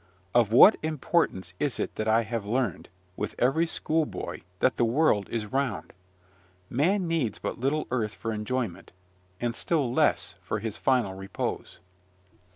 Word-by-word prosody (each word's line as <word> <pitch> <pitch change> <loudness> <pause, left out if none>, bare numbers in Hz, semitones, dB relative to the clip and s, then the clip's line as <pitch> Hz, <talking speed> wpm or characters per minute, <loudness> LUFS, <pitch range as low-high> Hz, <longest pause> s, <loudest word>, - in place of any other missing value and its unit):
Of 120 -3 +4
what 130 - +8
importance 155 - 0
is 140 -7 -1
it - - -2
that 110 - -3
I 110 +1 +4
have 115 -1 -3
learned, 115 -2 -2 0.3
with 105 +1 -4
every 135 +7 +2
schoolboy, 160 -1 -2 0.2
that 130 - +2
the - - +2
world 115 -4 +2
is 115 -2 -2
round? 130 -1 -2 0.8
Man 180 - +2
needs 155 -11 0
but - - -5
little 140 +5 0
earth 110 -5 -1
for 115 -1 -4
enjoyment, 110 -3 -3 0.5
and 120 -1 -1
still 140 -6 0
less - - +2
for - - -3
his 110 0 -4
final 125 -7 +1
repose. 95 0 -5
120 Hz, 150 wpm, -27 LUFS, 105-145 Hz, 0.8 s, what